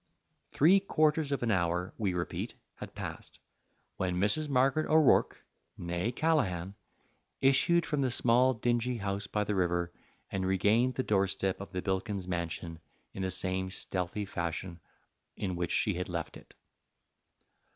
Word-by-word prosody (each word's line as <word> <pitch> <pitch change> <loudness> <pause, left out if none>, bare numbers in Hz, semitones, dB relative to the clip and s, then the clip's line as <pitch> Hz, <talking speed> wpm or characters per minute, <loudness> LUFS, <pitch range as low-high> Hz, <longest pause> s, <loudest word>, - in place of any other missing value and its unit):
Three 180 +7 +5
quarters 155 -5 +1
of 140 - -1
an 115 - +1
hour, 90 -1 0
we 100 -5 -1
repeat, 85 0 -3 0.2
had - - -10
passed, - - -7 0.6
when 90 -1 -1
Mrs. 105 +11 +2
Margaret 135 +3 +2
O'Rourke, 155 -3 +4 0.3
née 85 +7 -2
Callaghan, 100 - 0 0.7
issued 140 +6 +4
from 150 -2 -1
the 130 - +1
small, 125 +2 +3
dingy 120 +1 0
house 100 -1 -3
by 105 - -1
the 105 - -2
river 85 -2 0 0.4
and 95 -1 -2
regained 105 +7 +2
the 130 - 0
doorstep 95 -2 0
of 100 - -8
the 90 -2 -4
Bilkins 95 -1 -2
Mansion 85 -2 -4 0.3
in 95 - -5
the 95 - -1
same 95 0 -1
stealthy 95 +2 -3
fashion 85 -1 -4 0.6
in 95 -3 -2
which 85 -1 -2
she 105 - +1
had 90 +1 -4
left 85 -2 -4
it. - - -15
100 Hz, 145 wpm, -31 LUFS, 90-125 Hz, 0.7 s, Three